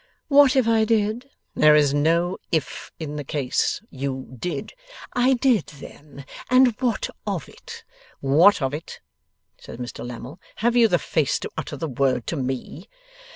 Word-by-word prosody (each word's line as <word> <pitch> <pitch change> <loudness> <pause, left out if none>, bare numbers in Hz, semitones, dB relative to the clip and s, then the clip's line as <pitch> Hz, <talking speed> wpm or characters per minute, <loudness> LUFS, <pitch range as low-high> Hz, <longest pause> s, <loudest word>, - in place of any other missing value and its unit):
'What 280 -2 +6
if 260 -4 +3
I 225 -1 +3
did?' 220 +3 0 0.2
'There 150 0 +5
is 145 -2 +3
no 170 +5 +1
"if" 160 -5 -2
in 150 -2 -6
the 145 - -4
case. 135 +4 -1
You 130 -1 -5
did.' 145 +3 -5 0.4
'I 250 +2 +3
did, 245 - +2
then. 140 -1 -12 0.2
And 255 +1 +6
what 245 -3 0 0.2
of - - -3
it?' 465 -1 -12 0.4
'What 155 +6 +4
of 135 +1 -1
it?' 155 +3 -7 0.6
says - - -10
Mr 120 0 -7
Lammle. 125 +6 -8 0.2
'Have 240 +2 0
you 235 -2 +6
the 180 - +2
face 155 -4 0
to - - -6
utter 145 - -5
the 160 - -3
word 130 -3 0
to - - -3
me? 135 +5 -5
160 Hz, 160 wpm, -23 LUFS, 140-225 Hz, 0.6 s, What